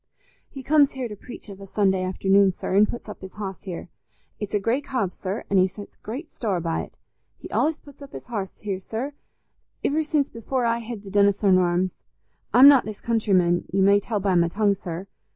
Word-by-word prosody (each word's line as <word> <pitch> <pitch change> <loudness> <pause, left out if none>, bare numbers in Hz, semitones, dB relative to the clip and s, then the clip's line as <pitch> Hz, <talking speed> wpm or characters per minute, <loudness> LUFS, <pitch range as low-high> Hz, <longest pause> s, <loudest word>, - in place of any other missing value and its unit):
He 270 -3 -9
comes 290 0 +4
here 260 -2 -3
to 210 - -8
preach 240 +4 -11
of 200 -1 -10
a 195 - -9
Sunday 190 -2 +1
afternoon, 195 +1 +3
sir, 185 - -4
an' 210 +2 +6
puts 240 - -7
up 210 - -9
his 190 0 -9
hoss 195 -3 -7
here. 180 -1 -6 0.5
It's 210 -1 -3
a - - +3
grey 230 +7 0
cob, 255 -10 -2
sir, 195 +3 -4
an' 195 - +1
he 185 0 +5
sets 200 +2 -11
great 265 +10 -7
store 200 -6 -2
by't. 165 -1 -3 0.4
He's - - -11
allays 310 0 +1
put 285 0 -16
up 280 - -10
his - - -9
hoss 205 -6 -5
here, 195 -3 -3
sir, 230 +9 -5 0.7
iver 305 +3 +2
since 300 -2 +1
before 240 +2 -2
I 230 0 +1
hed 230 -2 -7
the 195 - -10
Donnithorne 200 -1 +4
Arms. 180 +1 +1 0.6
I'm 260 +3 +9
not 280 -3 +8
this 215 -1 -6
countryman, 190 -7 +2
you 195 +1 +2
may 200 +1 +5
tell 210 +1 -2
by 195 -1 +1
my 170 -1 +4
tongue, 205 +3 +2
sir. 185 -2 -6
205 Hz, 210 wpm, -24 LUFS, 190-240 Hz, 0.7 s, I'm